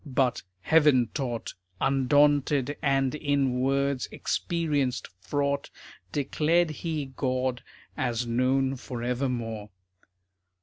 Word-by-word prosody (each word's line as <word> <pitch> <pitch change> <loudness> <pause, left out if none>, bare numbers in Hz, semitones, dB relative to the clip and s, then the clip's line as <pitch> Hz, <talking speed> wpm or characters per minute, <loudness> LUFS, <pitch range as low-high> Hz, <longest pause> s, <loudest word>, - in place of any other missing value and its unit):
But, 130 -4 0 0.2
heaven 145 - +4
taught, 120 -5 -3 0.3
Undaunted, 145 +1 +3
and 135 -2 +2
in 140 -4 0
words 135 0 0
experienced 150 -7 -1
fraught, 140 +9 -1 0.4
Declared 155 +4 +1
he 155 -3 -4
God 130 -1 -1 0.3
as 120 -4 -1
known 130 +3 +1
forevermore. 120 -3 -3
135 Hz, 85 wpm, -27 LUFS, 125-145 Hz, 0.4 s, heaven